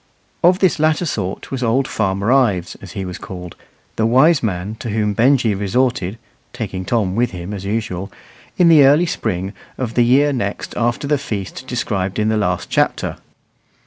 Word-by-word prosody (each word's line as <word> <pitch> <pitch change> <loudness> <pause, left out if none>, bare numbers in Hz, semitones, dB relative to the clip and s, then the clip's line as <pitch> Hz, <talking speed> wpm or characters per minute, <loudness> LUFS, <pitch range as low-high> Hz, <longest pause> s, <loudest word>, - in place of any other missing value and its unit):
Of 180 +2 +5
this 185 -4 +2
latter 155 +3 +2
sort 100 - -4
was 135 -1 -3
old 125 +3 +1
Farmer 100 +1 0
Ives, 105 -10 +2
as 95 -2 -10
he 95 -2 -4
was 90 -1 -6
called, 90 -2 -8 0.4
the 110 - +2
"wise 135 +7 +5
man" 100 -2 -2
to 115 - -5
whom 105 -1 0
Benjy 120 0 +3
resorted 105 0 0 0.4
(taking 95 -6 -5
Tom 100 -5 0
with 120 +2 +2
him 90 +2 -7
as 100 -1 -6
usual), 100 -3 -3 0.5
in 175 - +5
the 160 -4 +7
early 145 +6 +5
spring 95 - -3 0.2
of 120 -3 -3
the 120 - +4
year 140 +4 +4
next 105 -6 -3
after 120 +4 0
the 145 -1 +1
feast 110 0 -5
described 100 -7 -2
in 110 0 +1
the 110 - +1
last 90 -4 -1
chapter. - - 0
110 Hz, 175 wpm, -19 LUFS, 95-130 Hz, 0.5 s, the